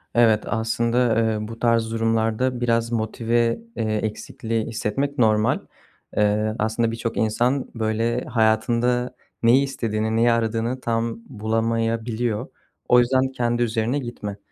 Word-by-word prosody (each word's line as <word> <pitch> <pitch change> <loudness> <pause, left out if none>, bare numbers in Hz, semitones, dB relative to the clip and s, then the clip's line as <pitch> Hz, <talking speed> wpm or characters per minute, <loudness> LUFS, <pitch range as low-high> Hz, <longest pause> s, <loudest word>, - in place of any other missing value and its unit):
Evet, 115 -3 +4
aslında, 115 +1 +1
eee, 110 -1 0
bu 115 +1 -9
tarz 115 -1 +2
durumlarda 115 +2 0
biraz 115 -1 +1
motive, 115 - 0 0.2
eee, 110 -1 -1
eksikliği 110 +1 -3
hissetmek 135 +6 -2
normal. 110 -2 +3 0.6
Eee, 105 +1 +2
aslında 110 +1 0
birçok 115 0 -4
insan 120 +5 +1
böyle 115 +2 0
hayatında 120 +2 +1 0.3
neyi 125 +4 +5
istediğini, 110 -5 -2
neyi 115 +1 +4
aradığını 115 +2 -1
tam 115 0 -1
bulamayabiliyor. 115 +1 -1 0.4
O 125 - +7
yüzden 130 +2 +3
kendi 120 -1 0
üzerine 115 +4 0
gitme. 105 -5 -6
115 Hz, 120 wpm, -23 LUFS, 110-120 Hz, 0.6 s, O